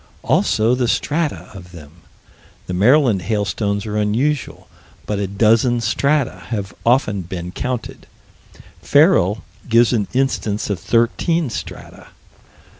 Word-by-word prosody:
Also 110 +3 +2
the 125 -1 0
strata 150 +5 -1
of 90 -3 -12
them. 75 -4 -12 0.7
The 90 - -5
Maryland 115 +1 +3
hailstones 100 +1 -2
are 105 -1 -3
unusual, 120 +8 -1 0.4
but 105 -1 -2
a 100 - -1
dozen 115 +5 +2
strata 115 -4 0
have 100 -4 -4
often 115 -5 +2
been 90 0 -6
counted. 125 +3 -5 0.7
Ferrel 145 - +3 0.3
gives 115 +1 +4
an 105 -4 0
instance 115 -6 -1
of 95 - -2
thirteen 125 +6 0
strata. - - -8
110 Hz, 115 wpm, -19 LUFS, 100-125 Hz, 0.7 s, gives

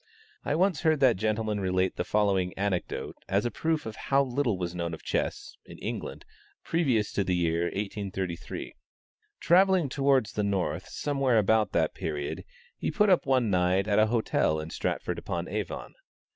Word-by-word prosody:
I - - 0
once 180 -2 +2
heard 160 -2 +3
that 130 -3 +5
gentleman 110 +1 -1
relate 95 -1 0
the - - -1
following 95 -4 +1
anecdote 100 -2 -2
as 100 +3 +1
a 120 - 0
proof 160 +7 -1
of 110 -1 -6
how 140 0 +2
little 125 -5 0
was 90 -1 -3
known 85 -2 -3
of - - -16
chess, - - -2
in - - -12
England, - - -5 0.4
previous 130 -11 +1
to 100 - +1
the 90 -1 0
year 85 -1 +1
1833. 95 -3 -4 0.7
Travelling 185 -3 +4
towards 135 -4 +2
the 105 - -1
north 100 -2 -1
somewhere 135 -4 +1
about 110 +1 +3
that - - +1
period, 75 -1 -4 0.3
he - - -1
put 210 -1 +3
up 180 - +3
one 130 -5 +2
night 90 +2 +2
at 105 0 +3
a 110 - +5
hotel 110 -8 +1
in 80 +1 -6
Stratford - - -2
upon - - -4
Avon. - - -4
105 Hz, 170 wpm, -28 LUFS, 95-135 Hz, 0.7 s, that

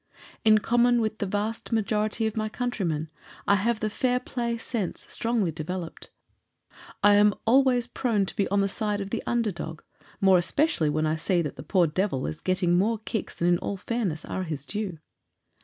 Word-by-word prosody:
In 215 -1 +6
common 240 +2 +3
with 220 -1 -1
the 200 - -1
vast 210 +5 -3
majority 215 0 0
of 220 - -2
my 215 -1 -1
countrymen 180 -11 -2 0.4
I 200 - +5
have 220 +3 0
the 215 - 0
"fair 250 +2 +1
play" 235 -2 -3
sense 225 -4 -3
strongly 225 -7 0
developed. 165 +2 -6 0.9
I 205 - +7
am 205 0 +5
always 250 0 +4
prone 235 -5 0
to - - -5
be 200 - +1
on 200 0 +2
the 195 - +2
side 210 0 -1
of 195 0 -5
the - - -1
under 235 -3 +1
dog 165 -2 -7 0.4
more 190 -2 +5
especially 185 - +1
when 155 +1 0
I 155 +1 0
see 175 +2 +1
that 150 - -5
the - - -8
poor 175 +4 +2
devil 160 -4 -1
is 155 - -5
getting 180 -1 +2
more 220 +4 +1
kicks 220 - -3
than 170 - 0
in 175 -1 +3
all 200 - -3
fairness 200 -7 -2
are 190 - -3
his 155 -6 -4
due. 205 -3 -3
205 Hz, 190 wpm, -26 LUFS, 175-230 Hz, 0.9 s, I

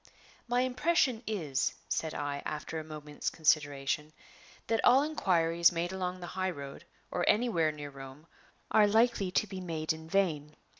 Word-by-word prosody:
"My 245 +1 +2
impression 255 -1 +1
is," 155 -11 -1
said 160 -1 -2
I, 145 -1 -3
after 155 +1 -4
a - - -6
moment's 150 -1 -5
consideration, 150 -1 0 0.5
"that 225 0 0
all 260 +3 +6
inquiries 170 - +3
made 175 +1 -2
along 185 -1 -3
the - - -5
high 185 0 -1
road, 140 -5 -8 0.3
or 175 - -1
anywhere 210 -9 +2
near 145 -1 -8
Rome, 135 +2 -11 0.5
are 210 -1 +6
likely 220 -2 +3
to 200 +4 +1
be 190 -2 -7
made 160 -3 -2
in 160 0 -11
vain. 155 -6 0
165 Hz, 155 wpm, -31 LUFS, 150-205 Hz, 0.5 s, all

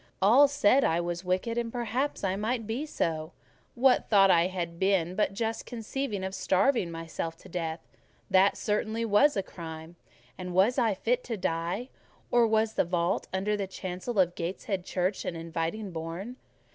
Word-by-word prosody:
All 240 +9 +6
said 275 -1 +3
I 165 - +2
was 175 +1 -3
wicked, 185 +6 -1
and 230 -1 -3
perhaps 245 +3 -2
I 190 -1 +1
might 225 +3 -2
be 240 +8 -3
so; 160 - -2 0.4
what 255 +1 +3
thought 195 -3 +6
had 180 +2 +2
I - - -16
been 180 0 +1
but 195 0 0
just 225 +1 -2
conceiving 230 -3 -4
of 190 0 -3
starving 195 +1 +2
myself 165 0 -5
to - - -15
death? 165 -1 -3 0.5
That 190 +1 +4
certainly 220 +2 -1
was 225 +6 +4
a 195 - 0
crime: 160 -1 -9 0.4
and 180 -1 -5
was 215 +8 +4
I 225 -5 +2
fit 245 +5 0
to 230 -3 -3
die? 175 +7 -2 0.4
Or 240 -1 +5
was 220 0 +2
the - - +2
vault 175 0 -1
under 195 +3 0
the 200 -2 -3
chancel 185 +4 -5
of 180 -2 +3
Gateshead 185 +2 -4
Church 185 +1 -1
an 170 - -3
inviting 165 +5 -3
bourne? 170 +9 -6
195 Hz, 170 wpm, -28 LUFS, 175-230 Hz, 0.5 s, All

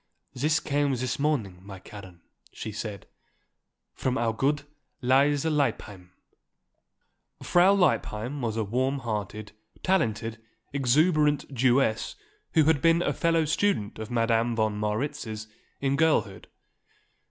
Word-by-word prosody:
"This 150 +4 +1
came 145 -1 0
this 125 +2 -3
morning, 125 -12 -1
my 95 0 -10
Karen," 95 -2 -12 0.3
she 110 - -6
said. 105 -1 -6 0.9
"From 130 -1 -1
our 115 -1 0
good 140 +5 0 0.4
Lise 140 +3 +3
Lippheim." 115 - -1 1.3
Frau 180 +3 +5
Lippheim 140 - 0
was 115 -2 -2
a 110 - +1
warm 130 +6 0
hearted, 105 -4 -4 0.3
talented, 115 - 0 0.3
exuberant 145 +2 +2
Jewess 125 -2 +2 0.4
who 160 - +6
had 150 -2 +3
been 165 +2 +4
a - - 0
fellow 165 -1 +2
student 155 - 0
of 110 - -6
Madame 115 0 +1
von 110 -2 0
Marwitz's 110 0 -3 0.4
in 135 0 +1
girlhood. 150 -11 +1
125 Hz, 120 wpm, -27 LUFS, 110-145 Hz, 1.3 s, who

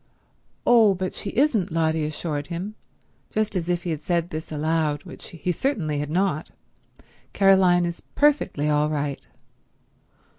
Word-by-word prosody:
"Oh, 225 -5 +6
but 185 0 -3
she 200 - -4
isn't," 230 - +2
Lotty 160 -1 +1
assured 150 -2 -4
him, 180 +6 -5 0.6
just 215 -1 -1
as 175 -1 -2
if 175 -1 0
he 175 - -2
had 155 -2 -3
said 170 -1 -1
this 155 +1 -6
aloud, 155 -1 0
which - - -10
he 170 +1 -3
certainly 170 - -1
had 145 0 -3
not. 180 -2 0 0.8
"Caroline 190 -3 +5
is 170 0 -5
perfectly 285 - +2
all 150 0 +2
right." 145 -2 -3
170 Hz, 145 wpm, -24 LUFS, 155-195 Hz, 0.8 s, Oh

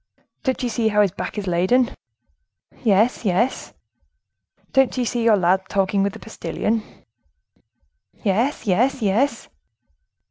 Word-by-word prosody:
"Don't 260 -3 -1
you 245 - 0
see 230 -1 0
how 210 -1 +4
his 195 - 0
back 200 - -6
is 205 - -3
laden?" 190 +8 +2 0.9
"Yes, 220 +3 +2
yes!" 210 +5 -1 1.0
"Don't 270 -1 +3
you 250 - 0
see 240 +1 -1
your 225 -2 +5
lad 185 +1 +2
talking 195 0 +1
with 200 0 0
the - - -10
postilion?" 225 0 -3 1.4
"Yes, 225 +7 0
yes, 235 +6 +1
yes!" 220 +8 +1
220 Hz, 130 wpm, -22 LUFS, 195-245 Hz, 1.4 s, your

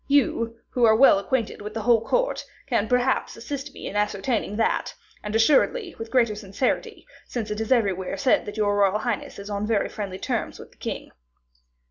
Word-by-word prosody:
You, 230 -5 +2 0.2
who 245 - 0
are 220 -1 +6
well 230 -4 +6
acquainted 225 +2 -2
with 210 +1 -7
the 220 - -3
whole 230 -1 +4
court, - - 0 0.2
can 235 -5 0
perhaps 250 0 +1
assist 275 +4 -5
me - - -10
in - - -5
ascertaining 210 +1 -1
that; 225 +1 0 0.3
and 210 +1 -4
assuredly, 305 - +3
with 225 0 -6
greater 235 -4 +3
certainty, 205 +4 -2 0.2
since 225 -4 -4
it 210 +1 -2
is 220 - -4
everywhere 195 -7 +1
said 265 -5 +2
that 205 +1 -6
your 205 -1 +2
royal 200 0 +3
highness 225 -1 -3
is 200 +1 -7
on 205 +1 -2
very 215 -3 +1
friendly 195 -4 -5
terms - - -3
with - - -12
the - - -25
king." - - -5
225 Hz, 190 wpm, -25 LUFS, 205-250 Hz, 0.3 s, are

